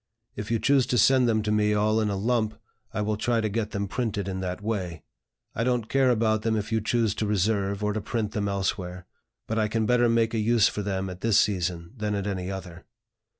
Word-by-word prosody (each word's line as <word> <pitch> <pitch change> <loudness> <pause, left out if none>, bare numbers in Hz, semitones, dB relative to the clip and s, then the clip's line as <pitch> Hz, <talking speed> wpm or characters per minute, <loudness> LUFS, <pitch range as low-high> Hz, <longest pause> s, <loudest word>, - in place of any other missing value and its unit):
If 105 0 -5
you 115 - +2
choose 135 +1 +3
to 125 - +1
send 125 +2 +5
them 110 -1 +1
to 105 - -1
me 105 0 +2
all 110 +1 +2
in 105 - 0
a 100 - -1
lump, 110 +1 0 0.3
I - - -2
will 105 0 -1
try 115 +2 +1
to 110 - 0
get 110 +1 -2
them 100 -1 -3
printed 105 -3 -2
in 95 -1 -3
that 90 0 -3
way. 95 -7 -3 0.5
I 115 - -1
don't 120 -3 0
care 135 -1 +3
about 110 -2 +2
them 110 0 0
if 105 0 -3
you 110 0 +1
choose 115 -1 +1
to 110 0 -2
reserve, 100 0 0
or 105 0 +1
to 110 - -2
print 110 0 -2
them 105 -3 -1
elsewhere; 90 -2 -3 0.4
but 110 0 -1
I 110 - +2
can 110 +1 0
better 120 0 +3
make 115 -1 +2
a 115 - 0
use 115 0 +4
for 105 - -3
them 95 -1 -2
at 90 0 -8
this 115 -3 +4
season 90 -2 -1
than 105 -1 -1
at 100 -1 -2
any 95 -2 -3
other." 90 -3 -7
105 Hz, 235 wpm, -26 LUFS, 100-115 Hz, 0.5 s, send